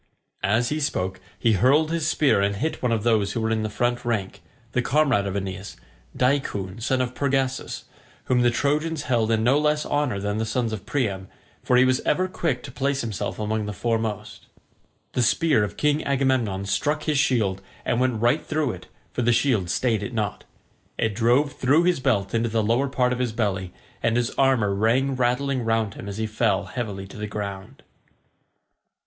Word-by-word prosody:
As 110 +4 +2
he 150 - -1
spoke 95 -10 -2 0.2
he 115 - +2
hurled 140 - +3
his 165 -2 0
spear 145 -9 +3
and 100 0 +1
hit 155 +10 -2
one 125 - +1
of 110 -2 0
those 110 -4 +2
who 120 - -2
were 110 0 0
in 110 -1 +1
the 110 - -2
front 120 +3 -1
rank, 105 -5 -2 0.3
the 120 - +1
comrade 130 -6 +2
of 95 - -3
Aeneas, 95 -3 -5 0.4
Deicoon 115 -7 0
son 130 +3 +1
of 125 -1 -2
Pergasus, 135 -1 -1 0.4
whom 125 -1 +2
the 120 - +4
Trojans 150 +4 0
held 115 -4 +1
in 110 -1 +2
no 130 +5 +4
less 150 0 +1
honour 145 -9 0
than 105 +2 -2
the - - 0
sons 115 0 -1
of 105 -2 -6
Priam, 100 -9 -1 0.4
for 125 - +3
he 130 - +6
was 130 0 +2
ever 185 0 +1
quick 160 -9 -2
to 135 - -8
place 140 +2 -1
himself 110 -5 -4
among 110 0 -2
the 105 - -4
foremost. 110 0 -3 0.7
The 125 - +1
spear 125 0 +3
of 105 - -4
King 150 0 +1
Agamemnon 130 -8 0
struck 150 +10 0
his 150 -3 +1
shield 105 -8 +1 0.2
and 120 - +1
went 125 -3 +1
right 120 +6 +3
through 155 -4 -1
it, - - -10 0.3
for - - -1
the 120 0 +3
shield 115 -6 +2
stayed 115 +1 +1
it 120 +5 -5
not. 105 -3 -2 0.5
It 110 -2 0
drove 120 +7 +2
through 145 +6 +3
his 175 -4 +2
belt 115 -8 0
into 115 0 +1
the 110 0 +1
lower 120 +6 +2
part 125 -2 +1
of 125 - -4
his 125 -3 -1
belly, 100 -5 -1 0.3
and 115 0 +1
his 120 0 0
armour 130 -7 +2
rang 120 +7 +2
rattling 130 +1 0
round 115 -2 0
him 100 - -8
as 100 - -6
he 110 - -1
fell 105 -2 0
heavily 100 -2 -5
to 95 - -12
the 105 0 -4
ground. 100 -2 -6
120 Hz, 195 wpm, -24 LUFS, 105-135 Hz, 0.7 s, he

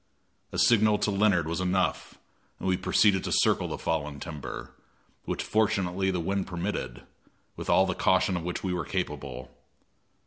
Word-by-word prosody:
A - - -5
signal 110 -2 +4
to 105 - 0
Leonard 100 -5 +2
was 85 +2 -2
enough, 90 -1 -1 0.4
and - - -5
we 95 - +3
proceeded 95 +1 +3
to - - -3
circle - - +3
the - - -4
fallen 75 -3 -2
timber, 75 -2 -7 0.5
which - - -2
fortunately 95 -3 +1
the 90 -2 -1
wind 95 +3 -1
permitted, 75 -8 -4 0.5
with - - -7
all 95 - +5
the 90 - -1
caution 95 +2 +2
of 85 - -2
which 90 +1 -4
we 95 -2 -1
were 90 -2 -2
capable. 75 -7 -4
90 Hz, 165 wpm, -28 LUFS, 85-95 Hz, 0.5 s, all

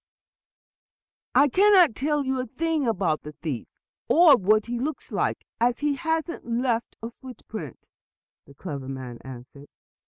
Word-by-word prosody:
"I 285 - +6
cannot 370 - +5
tell 295 +2 -1
you 260 0 -1
a 255 - -3
thing 310 +2 -1
about 180 -8 0
the 150 - -9
thief, 150 -5 -5 0.4
or 325 -3 +7
what 215 0 +2
he 240 0 -3
looks 300 +5 -4
like, - - -1
as 240 +3 +1
he 295 0 +1
hasn't 320 +4 -2
even 235 +1 -2
left 235 -3 -1
a 230 - -5
footprint," 225 - -10 0.6
the 140 - -16
clever 140 -5 -6
man 130 -3 -7
answered. 130 +2 -11
240 Hz, 150 wpm, -25 LUFS, -, 0.6 s, or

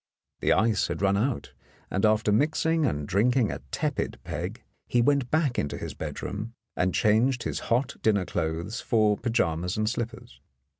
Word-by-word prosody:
The - - +1
ice 110 -2 +3
had - - -3
run 100 0 +3
out, 120 +5 -1 0.4
and 95 +3 +3
after 110 0 +2
mixing 155 +5 +2
and 75 - -2
drinking 115 +3 +2
a - - -6
tepid - - -2
peg, - - -5 0.2
he 120 - +2
went 135 0 +2
back 155 -3 +2
to 75 -10 -2
his - - -5
bedroom 110 +4 -5 0.2
and 90 0 +1
changed 120 +4 +3
his - - -2
hot 125 +2 +1
dinner 100 -4 +2
clothes 85 +7 -2
for 110 -3 +3
pyjamas 90 -7 0
and 110 0 +1
slippers. 120 +1 -4
110 Hz, 160 wpm, -27 LUFS, 100-125 Hz, 0.4 s, ice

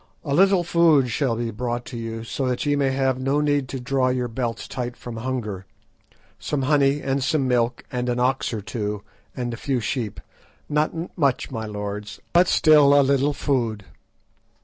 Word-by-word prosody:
A 140 - -2
little 190 +2 +4
food 160 -7 +4
shall 125 -1 0
be 115 0 -3
brought 120 +1 -3
to 125 - -8
you, 115 -1 -5
so 130 +3 -3
that 125 +2 -1
ye 145 0 +2
may 140 -1 +2
have 130 -1 0
no 135 +3 +1
need 145 -2 +1
to 135 - -4
draw 130 +1 0
your 125 -1 -1
belts 115 -1 -4
tight 125 -1 -5
from 120 -2 -8
hunger; 115 -6 -4 0.7
some 140 -2 -2
honey 140 0 +2
and 135 0 0
some 145 -1 +1
milk, 120 -1 +1
and 125 0 -2
an 120 0 0
ox 130 0 +1
or 110 -3 -3
two, 105 -1 -4 0.3
and 120 -1 -2
a - - -5
few 130 0 -1
sheep; 115 -2 -3 0.5
not 155 +3 -1
much, 140 -7 0
my 110 -3 -4
lords, 105 0 -5
but 175 +1 +5
still 150 -4 +6
a - - +5
little 140 +1 +2
food." 115 -8 -1
130 Hz, 185 wpm, -23 LUFS, 115-140 Hz, 0.7 s, still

